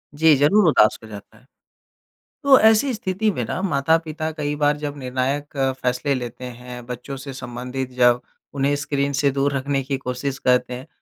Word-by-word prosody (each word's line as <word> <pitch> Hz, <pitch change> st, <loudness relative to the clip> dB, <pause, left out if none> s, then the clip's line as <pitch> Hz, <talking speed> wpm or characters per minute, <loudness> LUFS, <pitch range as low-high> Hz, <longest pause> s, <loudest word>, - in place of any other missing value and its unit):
जी, 160 Hz, 0 st, +5 dB
ज़रूर 175 Hz, +8 st, +4 dB
उदास 105 Hz, -8 st, +4 dB
कर 110 Hz, -, -12 dB
जाता 105 Hz, +1 st, -11 dB
है। 125 Hz, -, -23 dB, 1.0 s
तो 275 Hz, -1 st, +7 dB
ऐसी 225 Hz, +4 st, +4 dB
स्थिति 215 Hz, -1 st, -1 dB
में -, -, -3 dB
ना -, -, -3 dB
माता-पिता 160 Hz, -1 st, 0 dB
कई 150 Hz, -1 st, -3 dB
बार 145 Hz, 0 st, +1 dB
जब 145 Hz, -1 st, -5 dB
निर्णायक 135 Hz, +3 st, -3 dB, 0.2 s
फ़ैसले 125 Hz, +3 st, 0 dB
लेते 125 Hz, -1 st, -5 dB
हैं। 125 Hz, 0 st, -9 dB
बच्चों 125 Hz, +3 st, -6 dB
से 135 Hz, 0 st, -8 dB
संबंधित 125 Hz, +1 st, -5 dB
जब 125 Hz, -1 st, +3 dB, 0.3 s
उन्हें 140 Hz, +1 st, +1 dB
स्क्रीन 140 Hz, 0 st, -1 dB
से 140 Hz, 0 st, +2 dB
दूर 140 Hz, +1 st, 0 dB
रखने 135 Hz, +1 st, -1 dB
की 135 Hz, +1 st, -2 dB
कोशिश 130 Hz, +1 st, -4 dB
करते 125 Hz, 0 st, +2 dB
हैं। 125 Hz, +2 st, -8 dB
140 Hz, 175 wpm, -22 LUFS, 125-150 Hz, 1.0 s, तो